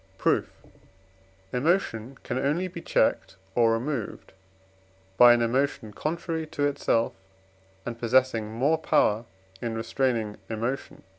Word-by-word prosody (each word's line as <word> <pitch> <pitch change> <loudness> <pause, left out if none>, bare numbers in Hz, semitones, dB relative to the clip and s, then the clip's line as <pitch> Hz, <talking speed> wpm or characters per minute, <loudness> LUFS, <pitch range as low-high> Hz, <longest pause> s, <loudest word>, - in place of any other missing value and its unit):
Proof. - - +1 1.0
Emotion 130 - 0
can 125 - -2
only 150 +7 0
be 170 -2 -8
checked - - +1 0.2
or 115 0 +4
removed 120 -1 -4 0.8
by 120 +4 +9
an 120 0 +4
emotion 120 -2 0
contrary 165 - -3
to 145 -1 -1
itself, 135 -5 +1 0.7
and 120 -1 -5
possessing 120 -2 +2
more 140 +8 +1
power 110 -7 +2 0.4
in 115 -2 -3
restraining 115 -2 -1
emotion 115 +4 -3
(IV. - - -22
125 Hz, 120 wpm, -27 LUFS, 115-145 Hz, 1.0 s, by